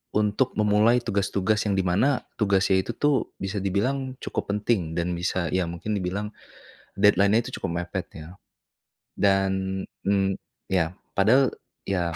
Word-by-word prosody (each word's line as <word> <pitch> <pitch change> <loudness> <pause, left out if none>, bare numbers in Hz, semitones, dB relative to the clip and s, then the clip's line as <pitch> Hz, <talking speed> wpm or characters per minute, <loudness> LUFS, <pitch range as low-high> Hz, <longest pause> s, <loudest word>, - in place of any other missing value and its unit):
untuk 105 +5 +1
memulai 110 +3 +3
tugas-tugas 100 0 0
yang 100 - +1
di 95 - +1
mana 110 +10 +2 0.2
tugasnya 95 -2 +3
itu 120 - -4
tuh 145 -2 0
bisa 95 +2 -4
dibilang 130 +8 -1
cukup - - -3
penting 100 -5 -1
dan 85 +1 -1
bisa 85 0 -1
ya 90 -2 0
mungkin 85 +5 -5
dibilang, 100 +1 -2 0.7
deadline-nya 105 +3 +4
itu 130 - -7
cukup 85 0 -2
mepet 95 +1 -5
ya, 80 +4 -10 0.9
dan, 95 -1 +1 0.2
mmm, 95 -1 +1 0.3
ya 90 -2 +1 0.2
padahal 125 +7 +4 0.3
ya 85 -4 -1
100 Hz, 140 wpm, -25 LUFS, 95-105 Hz, 0.9 s, deadline-nya